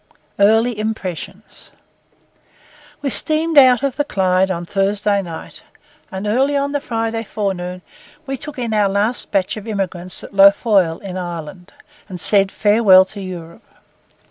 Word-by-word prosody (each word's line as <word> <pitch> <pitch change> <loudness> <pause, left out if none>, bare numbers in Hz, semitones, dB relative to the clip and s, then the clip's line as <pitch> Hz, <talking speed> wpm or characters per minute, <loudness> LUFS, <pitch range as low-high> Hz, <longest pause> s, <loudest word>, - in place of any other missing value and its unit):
EARLY 220 +3 +3
IMPRESSIONS 215 -6 -6 1.3
We 275 - -1
steamed 315 +4 0
out 255 -1 +5
of 275 -3 -2
the 290 - +1
Clyde 190 -6 +1
on 175 -2 -3
Thursday 200 +2 0
night, 170 -4 -9 0.5
and 190 +1 -5
early 265 +7 +1
on 280 0 -1
the 285 -1 -2
Friday 225 -3 -3
forenoon 185 -4 -4 0.4
we 270 -1 -3
took 295 +3 -8
in 235 -3 -3
our 205 -2 +2
last 205 +5 -1
batch 195 +2 -1
of 215 +1 -9
emigrants 185 -4 -3
at - - -11
Lough 195 0 +8
Foyle, 195 -6 +1
in 185 -2 -7
Ireland, 175 +1 -7 0.4
and 180 -2 -7
said 195 +1 +4
farewell 205 -3 +5
to 205 - -8
Europe. 175 0 -9
200 Hz, 145 wpm, -18 LUFS, 185-230 Hz, 1.3 s, Lough